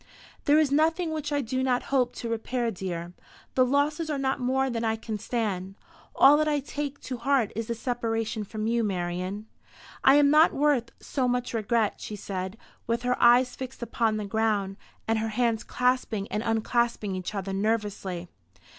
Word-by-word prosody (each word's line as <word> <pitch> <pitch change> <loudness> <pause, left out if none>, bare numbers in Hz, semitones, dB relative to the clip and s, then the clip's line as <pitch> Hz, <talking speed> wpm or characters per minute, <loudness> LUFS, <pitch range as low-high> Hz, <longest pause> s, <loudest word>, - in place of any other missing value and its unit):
"There 290 0 +5
is 310 -3 +3
nothing 320 +3 +2
which 305 -2 -3
I 290 -1 +1
do 260 +1 -2
not 255 -1 +1
hope 255 -3 +2
to 235 - -5
repair, 230 +1 -1
dear. 175 -3 -5 0.4
The 255 - +4
losses 290 +5 +1
are 295 - -1
not 270 -1 0
more 260 +2 +1
than 235 -3 -2
I 220 -1 +1
can 220 -1 -5
stand. 195 -5 -2 0.4
All 290 +2 +7
that 310 0 +1
I 295 -1 +2
take 285 0 -5
to 255 - -5
heart 255 -3 +1
is 225 0 -3
the 235 - -2
separation 225 -2 -2
from 215 +1 -5
you, 230 +1 +1
Marian." 185 +1 -3 0.6
"I 270 - +7
am 290 -1 +5
not 310 +2 +6
worth 280 -5 +2
so 260 -3 -1
much 245 0 -1
regret," 225 -1 0
she 210 - -5
said, 190 0 -5 0.3
with 235 +1 -1
her 250 0 +2
eyes 245 +1 +5
fixed 260 -1 -7
upon 225 -1 0
the 210 - -3
ground, 205 -2 0 0.3
and 225 0 +2
her 220 0 -1
hands 230 0 0
clasping 250 -5 0
and 210 - -1
unclasping 225 -2 0
each 185 +3 -5
other 195 -1 -3
nervously. 200 -4 -2
235 Hz, 180 wpm, -27 LUFS, 215-265 Hz, 0.6 s, All